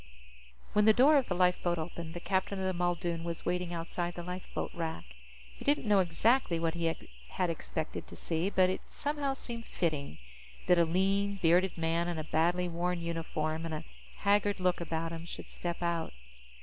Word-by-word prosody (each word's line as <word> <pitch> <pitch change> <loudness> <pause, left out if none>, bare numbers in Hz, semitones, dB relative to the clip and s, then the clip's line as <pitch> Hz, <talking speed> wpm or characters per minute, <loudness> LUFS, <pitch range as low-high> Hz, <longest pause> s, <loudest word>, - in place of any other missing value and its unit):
When 210 0 +4
the 220 - +8
door 290 +4 +7
of 265 - -3
the 180 - -1
lifeboat 180 -1 +2
opened, 165 0 -5
the - - -3
captain 190 +2 0
of 190 - -2
the 185 - +1
Muldoon 175 -1 -1
was 170 -1 -4
waiting 180 -1 -1
outside 175 +1 -3
the 175 - -5
lifeboat 180 +1 -4
rack. 165 -2 -3 0.5
He - - -10
didn't 285 -3 +2
know 205 -2 +5
exactly 185 +2 +2
what 165 -1 0
he 170 -1 -2 0.4
had 180 - -1
expected 160 -1 -4
to - - -10
see, 165 +3 -1
but 185 -2 +4
it 185 - -3
somehow 285 -2 -2
seemed 235 -3 -6
fitting 145 - -2 0.5
that 180 -1 +5
a 170 - +6
lean, 195 +4 +1
bearded 180 +2 +3
man 165 +1 +1
in 175 -2 -2
a 155 - -2
badly 175 +3 +1
worn 175 +1 -1
uniform 160 -1 -2
and 165 -1 -3
a 155 +1 -6 0.3
haggard 205 0 +2
look 180 -1 +1
about 165 0 -2
him 165 0 -5
should 170 - -8
step 175 0 -4
out. 170 -1 -1
175 Hz, 190 wpm, -32 LUFS, 165-190 Hz, 0.5 s, the